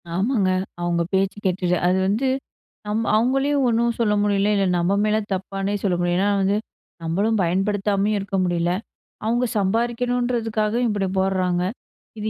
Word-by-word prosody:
ஆமாங்க. 200 0 +1 0.3
அவுங்க 175 0 0
பேச்சு 195 +1 +1
கேட்டுட்டு 180 -1 +1
அது 185 - +3
வந்து 220 +7 +1 0.6
நம்ப 220 +2 -1
அவுங்களையும் 270 +5 +2
ஒண்ணும் 235 0 +1
சொல்ல 215 -3 +2
முடியல. 205 0 +2
இல்ல, 195 -1 +2
நம்ம 175 +3 +1
மேல 215 0 +2 0.2
தப்பானே 195 +1 -3
சொல்ல 190 -3 +1
முடியல. 175 0 +1
ஏன்னா 200 +2 +2
வந்து, 195 +2 +2 0.5
நம்மளும் 200 +7 0
பயன்படுத்தாமயும் 200 +3 +1
இருக்க 195 0 -3
முடியல. 175 -1 0 0.5
அவுங்க 240 +3 +1
சம்பாதிக்கணுன்றதுக்காக, 230 +1 0
இப்பிடி 205 -3 0
போடுறாங்க! 185 -2 +1 0.6
இது 215 +1 -2
200 Hz, 135 wpm, -22 LUFS, 190-225 Hz, 0.6 s, அது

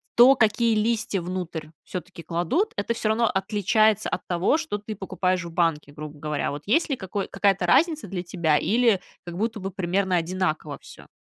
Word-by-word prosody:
то, 255 +3 +8
какие 225 0 +2
листья 215 -3 0
внутрь 175 -3 -5 0.2
всё-таки 180 -2 -7
кладут. 285 - 0
Это 235 - 0
всё 215 - -1
равно 225 +1 +2
отличается 215 +2 +2
от 180 - -4
того, 180 - +2
что 315 -11 -3
ты 210 +1 -7
покупаешь 185 -2 -1
в 170 - -7
банке, 160 -4 0
грубо 150 0 -9
говоря. 150 -1 -2
Вот 145 +1 -6
есть 320 +9 +2
ли 270 - -1
какой 190 +1 -4
какая-то 195 -3 +1
разница 310 - +3
для 180 -1 -4
тебя 170 -4 +1
или 225 0 +3 0.3
как 175 0 -7
будто 220 +1 -2
бы 195 0 -4
примерно 185 +1 0
одинаково 165 -4 -2
всё? - - -14
190 Hz, 180 wpm, -25 LUFS, 170-220 Hz, 0.3 s, то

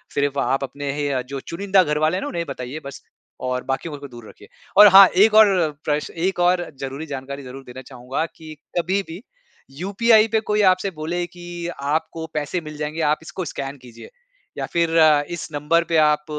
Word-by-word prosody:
सिर्फ़ 140 0 0
आप 135 0 0
अपने 140 +2 -5
ही 145 0 -2
अ, 130 -2 -1
जो 135 +2 -7
चुनिंदा 190 +6 +1
घरवाले 155 +2 0
हैं - - -4
ना - - -4
उन्हें 170 - -3
ही - - -4
बताइए 130 +3 -6
बस 140 - -9 0.4
और 125 0 -2
बाकियों 145 +3 -3
को 140 - -9
दूर 120 -2 -12
रखिए। 410 +2 -16 0.3
और 210 - +11
हाँ, 195 0 +9
एक 210 +5 +4
और 190 -7 +5
प्रश्न 150 0 -2
एक 190 - -3
और 175 0 +2
ज़रूरी 135 +3 -5
जानकारी 140 0 -6
ज़रूर 130 +1 -10
देना 125 +1 -10
चाहूँगा 130 +4 -4
कि 160 -1 -11 0.3
कभी 190 +4 0
भी 170 +4 -8 0.6
यूपीआई 215 +4 +3
पे 220 - +3
कोई 210 -1 0
आपसे 195 +1 -4
बोले 170 +2 -3
कि 175 -1 -8
आपको 155 +3 -2
पैसे 150 +4 -2
मिल 155 -1 -9
जाएँगे 150 +2 -4
आप - - -4
इसको 185 +2 -6
स्कैन 140 -1 -6
कीजिए 125 - -13 0.5
या - - -2
फिर 170 -1 +1 0.4
इस 175 -2 -5
नंबर 150 +4 +1
पे 165 - +3
आप 150 0 0
155 Hz, 200 wpm, -21 LUFS, 140-180 Hz, 0.6 s, और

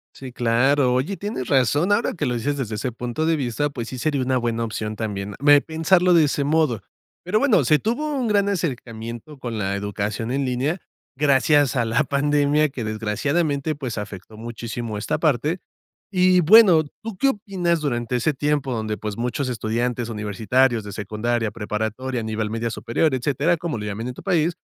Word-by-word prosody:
Sí, 130 -2 -9
claro. 125 +3 +2
Oye, 155 +10 -1
tienes 200 - -4
razón. 145 - +2
Ahora 215 +3 +2
que 175 - -2
lo 125 - 0
dices 140 +5 -1
desde 115 -5 -3
ese 120 +4 -3
punto 120 +6 -3
de 165 0 +3
vista, 140 +1 -1
pues 120 -4 -6
sí 130 - -6
sería 145 -1 0
una 130 0 +1
buena 115 -1 -1
opción 110 -1 -4
también 100 -2 -4
me 145 0 +6
pensarlo 175 +3 +3
de 165 -2 +6
ese 140 0 0
modo. 150 -7 +1 0.4
Pero, 180 +5 +1
bueno, 220 - +4
se 150 +5 +4
tuvo 290 +7 -1
un 250 -4 -1
gran 200 -1 +2
acercamiento 125 - -4
con 120 -4 -5
la 100 -1 -1
educación 105 +3 -3
en 135 0 0
línea 135 +8 -1 0.4
gracias 145 0 +3
a 120 -3 +1
la 115 +1 +2
pandemia 145 +1 +2
que, 130 -4 -6
desgraciadamente, 140 +8 -1
pues, 130 -6 -5
afectó 105 +1 -7
muchísimo 115 -1 -5
esta 105 - -1
parte. 155 +3 +1 0.5
Y 185 -1 +4
bueno, 180 -2 +7 0.2
¿tú 220 -3 -6
qué 275 - +3
opinas 185 - -1
durante 120 -3 -1
ese 145 +5 +1
tiempo 145 -1 -1
donde, 110 -2 -3
pues, 105 -2 -5
muchos 125 +3 -2
estudiantes 120 +1 -2
universitarios 110 +3 +1
de 105 - -8
secundaria, 110 +2 -2
preparatoria, 110 +3 -3
a - - -5
nivel 110 -1 -2
media 115 0 -2
superior, 135 +7 0
etcétera, 145 +6 +1
como 160 -6 -3
lo 105 - -5
llaman 105 +4 -4
en 125 - -4
tu - - -11
país, 170 -3 +1
130 Hz, 185 wpm, -22 LUFS, 115-155 Hz, 0.5 s, bueno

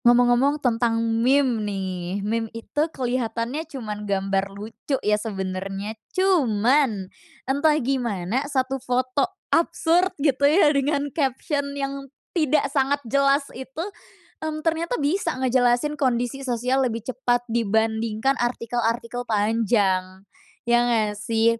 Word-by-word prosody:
Ngomong-ngomong 245 +4 +4
tentang 230 -1 +2 0.2
meme 255 -2 +3
nih. 190 -1 -3
Meme 225 +1 -1
itu 260 +5 -3
keliatannya 250 +2 -2
cuman 210 -6 -6
gambar 195 0 0
lucu 215 +7 -4
ya 210 - +3
sebenernya, 195 0 -4 0.2
cuman 260 - +3 0.4
entah 285 +3 +2
gimana 240 -5 -1
satu 265 -1 -1
foto 255 +4 0 0.2
absurd 340 +2 +3
gitu 280 -2 +1
ya 305 -2 +5
dengan 280 +1 +1
caption 280 0 -1
yang 275 0 -4 0.2
tidak 305 -4 +2
sangat 275 0 +2
jelas 275 +3 +2
itu, 265 +5 -6 0.6
mmm, 310 0 -4
ternyata 330 +1 0
bisa 315 +1 0
ngejelasin 255 +2 +2
kondisi 245 0 0
sosial 250 +1 0
lebih 230 -4 -1
cepat 245 -1 0
dibandingkan 220 +2 +1
artikel-artikel 240 0 -1
panjang, 205 -4 +1 0.4
ya 240 0 +4
nggak 225 -3 +1
sih? 230 +1 +1
245 Hz, 115 wpm, -24 LUFS, 220-275 Hz, 0.6 s, ya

